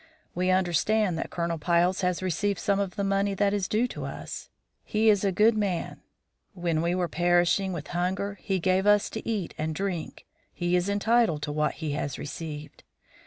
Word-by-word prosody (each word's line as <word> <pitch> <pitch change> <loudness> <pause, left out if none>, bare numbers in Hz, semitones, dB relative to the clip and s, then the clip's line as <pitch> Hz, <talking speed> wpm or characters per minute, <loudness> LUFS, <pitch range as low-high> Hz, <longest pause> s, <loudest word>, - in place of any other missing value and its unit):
We 180 +1 0
understand 185 +2 +2
that - - -3
Colonel 170 -1 -2
Piles 175 +3 +2
has 180 0 0
received 200 +2 0
some 200 -1 +1
of 195 -2 -2
the 200 - -1
money 195 0 +1
that 200 +1 +2
is 200 -3 0
due 225 +4 +1
to - - -6
us; - - -7 0.3
he 220 +1 +2
is 205 -1 +1
a 195 - +2
good 215 +5 +4
man; 195 -6 -2 0.5
when 170 -3 0
we 170 +1 +1
were 180 -1 0
perishing 175 +3 +2
with 160 -4 -6
hunger 190 +3 -2
he 195 -2 0
gave 185 +2 +1
us 205 0 +4
to 220 - -5
eat 205 -7 -2
and 155 0 -2
drink. 185 -3 -4 0.3
He 175 0 0
is 180 +2 +1
entitled 205 -6 +2
to 150 - -2
what 150 0 0
he 155 -3 -4
has 140 -2 -3
received. 150 0 -7
185 Hz, 190 wpm, -27 LUFS, 170-200 Hz, 0.5 s, good